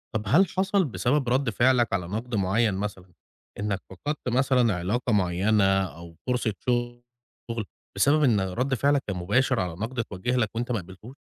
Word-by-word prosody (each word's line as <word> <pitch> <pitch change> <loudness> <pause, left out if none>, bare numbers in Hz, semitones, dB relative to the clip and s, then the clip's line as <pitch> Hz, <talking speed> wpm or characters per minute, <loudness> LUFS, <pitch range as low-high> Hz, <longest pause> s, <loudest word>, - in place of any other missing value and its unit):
طَب 110 - 0
هل 175 - +5
حصل 190 +1 +1
بسبب 130 0 0
رد 130 +1 +2
فعلك 120 0 +2
على 90 -3 -1
نقد 115 +5 -4
معيّن 105 +2 +2
مثلًا 95 -2 -5 0.5
إنك 100 -1 -1
فقدت 145 - -4
مثلًا 125 -3 +2
علاقة 105 +7 -1
معيّنة 100 +2 +2 0.3
أو 85 0 -12
فرصة 125 -3 0 1.0
شغل 115 -2 -3 0.3
بسبب 145 +10 +3
إن 115 -7 +4
رد 120 +9 -1
فعلك 140 +2 +2
كان 100 - -2
مباشر 120 +8 +1
على 90 -3 -2
نقد 115 +8 -5
اتوجّه 115 +2 -2
لك 115 -4 +1
وانت 120 +2 -2
ما 115 - 0
قبلتوش؟ 95 +8 -12
115 Hz, 165 wpm, -26 LUFS, 95-130 Hz, 1.0 s, هل